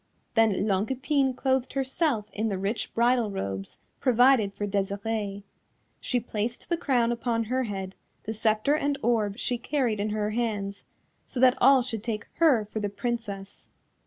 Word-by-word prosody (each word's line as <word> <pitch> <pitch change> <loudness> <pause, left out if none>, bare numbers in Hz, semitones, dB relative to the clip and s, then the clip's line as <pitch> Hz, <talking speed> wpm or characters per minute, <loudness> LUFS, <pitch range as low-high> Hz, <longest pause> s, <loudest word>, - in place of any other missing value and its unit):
Then 225 -4 +3
Longue 200 0 +1
Epine 265 0 +1
clothed 265 -1 0
herself 270 -3 0
in 220 +2 -1
the 195 - -2
rich 200 +4 -2
bridal 235 -1 +3
robes 100 - -4 0.2
provided 245 -4 +4
for 200 +1 -4
Desirée. 200 +1 -2 0.6
She 250 - 0
placed 230 +3 -4
the 340 - +2
crown 250 -8 +1
upon 235 -1 -1
her 255 +3 -1
head, 195 -3 -5 0.3
the 220 - -4
sceptre 220 +5 +1
and 285 -2 0
orb 220 -3 +1
she 245 -1 -1
carried 240 -5 0
in 210 +1 -1
her 210 0 -1
hands, 205 -4 -2 0.4
so 255 - -4
that 255 -1 +6
all 265 0 +6
should 225 -4 -4
take 215 -1 -3
her 275 -10 +4
for 215 +1 -5
the 205 -1 -1
Princess. 205 -3 -5
225 Hz, 160 wpm, -27 LUFS, 205-255 Hz, 0.6 s, that